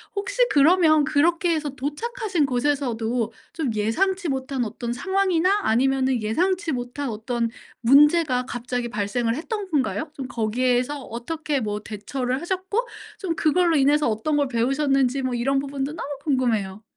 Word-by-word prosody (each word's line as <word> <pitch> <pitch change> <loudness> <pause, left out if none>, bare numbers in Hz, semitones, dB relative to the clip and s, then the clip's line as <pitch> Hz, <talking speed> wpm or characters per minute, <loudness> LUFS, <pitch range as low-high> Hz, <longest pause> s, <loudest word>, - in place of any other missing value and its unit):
혹시 - - -2
그러면 310 +1 +5
그렇게 330 +4 +2
해서 305 -2 -2
도착하신 345 - -2
곳에서도 245 -4 -1 0.2
좀 315 -7 -2
예상치 345 - 0
못한 265 -1 -2
어떤 235 +2 -4
상황이나 380 +4 +1
아니면은 260 +1 +2
예상치 355 - 0
못한 250 +3 -4
어떤 230 +1 -2 0.3
문제가 280 0 +5
갑자기 245 0 -3
발생을 230 +2 -1
했던 405 - -4
건가요? 300 +1 -1
좀 270 -3 -6
거기에서 245 +4 0
어떻게 285 +5 -3
뭐 210 -1 -3
대처를 250 +5 -3
하셨고 380 +7 -2 0.3
좀 355 -5 -2
그걸로 335 +1 +2
인해서 290 +2 +3
어떤 260 +8 0
걸 285 - +2
배우셨는지 270 +2 +1
뭐 255 - -1
이런 270 +3 +1
부분도 275 +1 -3
너무 325 - -6 0.2
궁금해요. 225 -8 0
275 Hz, 345 characters per minute, -23 LUFS, 245-325 Hz, 0.3 s, 그러면